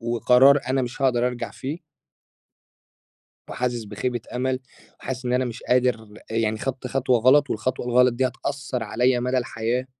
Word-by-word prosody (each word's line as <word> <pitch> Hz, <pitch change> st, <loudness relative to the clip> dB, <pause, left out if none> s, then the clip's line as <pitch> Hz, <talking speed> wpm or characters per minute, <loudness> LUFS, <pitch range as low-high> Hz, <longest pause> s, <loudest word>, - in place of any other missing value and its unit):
وقرار 125 Hz, +4 st, +5 dB
أنا 130 Hz, 0 st, +1 dB
مش 125 Hz, +2 st, -5 dB
هاقدر 125 Hz, -2 st, +2 dB
أرجع 120 Hz, -1 st, -4 dB
فيه 145 Hz, +5 st, -6 dB, 1.7 s
وحاسس 120 Hz, -2 st, -2 dB
بخيبة 120 Hz, +4 st, -3 dB
أمل، 130 Hz, +1 st, -1 dB, 0.4 s
وحاسس 130 Hz, -1 st, -5 dB
إن 125 Hz, -, -1 dB
أنا 125 Hz, +1 st, +2 dB
مش 120 Hz, -1 st, -6 dB
قادر 125 Hz, -3 st, +1 dB, 0.2 s
يعني 110 Hz, -1 st, 0 dB
خدت 130 Hz, +2 st, -4 dB
خطوة 130 Hz, -1 st, +1 dB
غلط 135 Hz, +5 st, +4 dB
والخطوة 120 Hz, +3 st, -2 dB
الغلط 125 Hz, 0 st, +4 dB
دي 130 Hz, +2 st, +1 dB
هتأثَّر 130 Hz, 0 st, -4 dB
عليَّ 120 Hz, +3 st, +1 dB
مدى 125 Hz, +1 st, 0 dB
الحياة. 120 Hz, 0 st, -2 dB
125 Hz, 150 wpm, -23 LUFS, 120-130 Hz, 1.7 s, وقرار